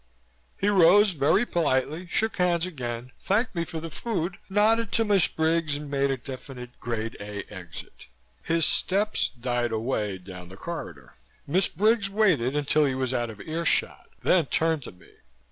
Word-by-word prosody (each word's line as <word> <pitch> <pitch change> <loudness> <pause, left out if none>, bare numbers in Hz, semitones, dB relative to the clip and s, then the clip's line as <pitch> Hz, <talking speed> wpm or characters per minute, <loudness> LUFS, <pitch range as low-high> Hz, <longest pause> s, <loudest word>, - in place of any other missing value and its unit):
He 200 - 0
rose, 200 +1 +6
very 165 - +2
politely, 155 - 0
shook 220 +5 0
hands 175 -2 +2
again, 125 -7 -5
thanked 220 +5 0
me 170 -2 -1
for 170 -1 -6
the 165 0 -7
food, 185 +3 -3
nodded 220 +3 +2
to 225 - +2
Miss 200 -4 +4
Briggs 160 -2 0
and 145 -1 -6
made 140 0 +1
a 135 - 0
definitely 125 -1 -9
Grade 115 -2 -3
A 105 0 -6
exit. 90 -4 -10 0.3
His 165 -1 +1
steps 205 +3 +1
died 120 -1 -1
away 110 -3 -1
down 90 -1 -11
the 95 - -12
corridor. 85 - -7 0.3
Miss 180 +6 +2
Briggs 210 +2 +2
waited 190 - +2
until 150 +1 +2
he 135 -2 0
was 130 -1 -1
out 120 -2 -1
of 105 -2 -10
earshot 165 +1 -1
then 170 -6 +3
turned 160 0 +1
to - - -8
me. 90 -2 -20
155 Hz, 165 wpm, -26 LUFS, 120-185 Hz, 0.3 s, rose